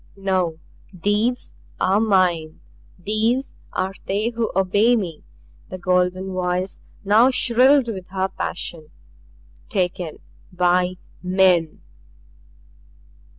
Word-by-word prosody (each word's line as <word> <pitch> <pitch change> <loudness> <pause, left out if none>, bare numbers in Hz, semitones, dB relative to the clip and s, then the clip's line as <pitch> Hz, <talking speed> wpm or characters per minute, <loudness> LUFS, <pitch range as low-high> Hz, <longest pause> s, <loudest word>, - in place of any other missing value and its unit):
"No! 185 -4 0 0.3
THESE 205 +6 -1 0.3
are 195 +2 +3
mine. 180 -7 +1 0.4
These 220 +8 -1 0.2
are 190 +1 -2
they 205 +4 0
who 230 -1 -2
obey 205 +5 +3
me." 175 -9 -3 0.5
The 185 - -6
golden 185 +1 0
voice 180 +1 -2 0.2
now 220 +5 +5
shrilled 255 +1 +4
with 190 -5 -5
her 190 0 -1
passion. 165 -5 -5 0.8
"Taken 180 -4 -2 0.3
by 180 0 +2 0.3
men!" 180 -3 +2
190 Hz, 95 wpm, -22 LUFS, 180-215 Hz, 0.8 s, now